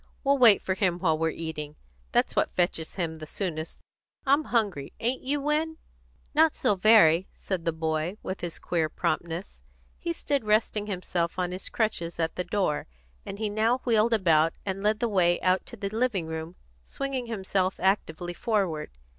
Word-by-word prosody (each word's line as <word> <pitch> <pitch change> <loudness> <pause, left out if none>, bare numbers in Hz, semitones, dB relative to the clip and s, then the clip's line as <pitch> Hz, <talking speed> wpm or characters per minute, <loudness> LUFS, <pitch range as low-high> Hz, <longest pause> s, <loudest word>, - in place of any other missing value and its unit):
We'll 280 -1 +3
wait 230 -5 +7
for 190 - 0
him 185 -3 +1
while 165 -3 +2
we're 160 +1 0
eating. 155 -2 -5 0.4
That's - - +1
what - - +1
fetches 175 -3 0
him 165 -4 -3
the 155 - -8
soonest. 160 -3 -4 0.5
I'm 285 +3 +3
hungry. 200 - 0
Ain't 245 +3 0
you, 285 +2 0
Win?" 305 +3 0 0.6
"Not 315 +1 +4
so - - +2
very," 190 -4 +5
said 185 -4 -4
the 165 - +2
boy, 160 +3 -2
with 185 - -5
his 175 -2 -4
queer 165 -3 -1
promptness. 170 - -3 0.4
He - - -2
stood 280 - -1
resting 215 0 +1
himself 180 -3 -2
on 180 -1 -1
his 185 +1 -4
crutches 175 -7 -1
at 165 -1 -1
the 180 - -1
door, 185 -6 -1 0.4
and 195 - -5
he 215 0 -1
now 220 +4 +2
wheeled 230 -1 +3
about, 165 -6 +4
and 195 0 -3
led 210 +1 +1
the 240 - +2
way 175 -5 +3
out 185 0 +1
to 235 - -7
the 200 -1 -3
living 220 -5 0
room, 160 +2 -6 0.3
swinging 265 - -4
himself 190 -3 -1
actively 175 -3 0
forward. 185 -8 -1
190 Hz, 175 wpm, -27 LUFS, 165-220 Hz, 0.6 s, wait